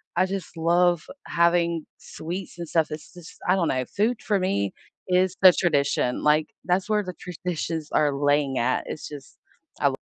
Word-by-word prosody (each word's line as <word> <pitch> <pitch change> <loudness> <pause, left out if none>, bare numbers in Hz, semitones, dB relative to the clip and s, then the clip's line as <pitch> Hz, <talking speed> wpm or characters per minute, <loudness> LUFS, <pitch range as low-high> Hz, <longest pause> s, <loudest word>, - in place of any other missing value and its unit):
I 185 - +3
just 190 -2 -5
love 175 0 +3 0.2
having 170 -1 +2
sweets 175 +2 -7
and 170 -1 -6
stuff. 160 -2 +2
It's 155 +3 -8
just 175 -2 -12
I - - +4
don't 170 -4 +1
know, 130 0 0
food 220 - -1
for 205 -3 +1
me 100 - 0 0.4
is 185 0 +2
the 185 -1 +10
tradition, 140 -7 +1
like, 150 +1 +3 0.2
that's 185 +3 0
where 210 -1 +2
the 180 -1 -6
traditions 165 -2 -4
are 145 -2 +2
laying 145 -1 +1
at, 125 +2 +1
it's - - -6
just, 145 -3 -11 0.4
I - - +5
wo - - +5
170 Hz, 180 wpm, -25 LUFS, 150-180 Hz, 0.4 s, the